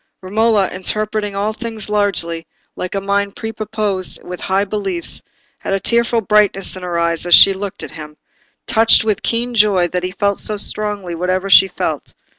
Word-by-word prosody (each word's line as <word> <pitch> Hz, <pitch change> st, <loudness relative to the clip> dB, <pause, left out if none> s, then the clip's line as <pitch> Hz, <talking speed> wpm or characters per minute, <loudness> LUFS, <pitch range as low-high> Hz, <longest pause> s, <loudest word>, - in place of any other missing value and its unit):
Romola, 210 Hz, +1 st, +2 dB
interpreting 210 Hz, +2 st, -3 dB
all 205 Hz, +2 st, -1 dB
things 225 Hz, -2 st, -6 dB
largely, 190 Hz, -6 st, -1 dB, 0.3 s
like 185 Hz, +2 st, -5 dB
a -, -, 0 dB
mind 200 Hz, 0 st, -1 dB
prepossessed 215 Hz, -3 st, -3 dB
with 180 Hz, 0 st, -7 dB
high 195 Hz, +1 st, 0 dB
beliefs, 195 Hz, -4 st, -3 dB, 0.4 s
had 195 Hz, -, -2 dB
a -, -, -1 dB
tearful 235 Hz, +3 st, +1 dB
brightness 210 Hz, -2 st, +2 dB
in 185 Hz, -, -8 dB
her 175 Hz, -1 st, -3 dB
eyes 170 Hz, 0 st, -1 dB
as 175 Hz, -, +8 dB
she 195 Hz, -, +7 dB
looked 195 Hz, 0 st, -6 dB
at -, -, -7 dB
him, 150 Hz, -1 st, -10 dB, 0.5 s
touched 225 Hz, 0 st, +4 dB
with 215 Hz, -3 st, -1 dB
keen 240 Hz, +1 st, -1 dB
joy 205 Hz, -5 st, +3 dB
that 180 Hz, +1 st, -3 dB
he 180 Hz, -, -2 dB
felt 200 Hz, +1 st, -1 dB
so 215 Hz, -, -1 dB
strongly 205 Hz, -3 st, -1 dB
whatever 185 Hz, +3 st, -2 dB
she 190 Hz, -, +8 dB
felt. 180 Hz, -, -4 dB
200 Hz, 175 wpm, -17 LUFS, 185-215 Hz, 0.5 s, as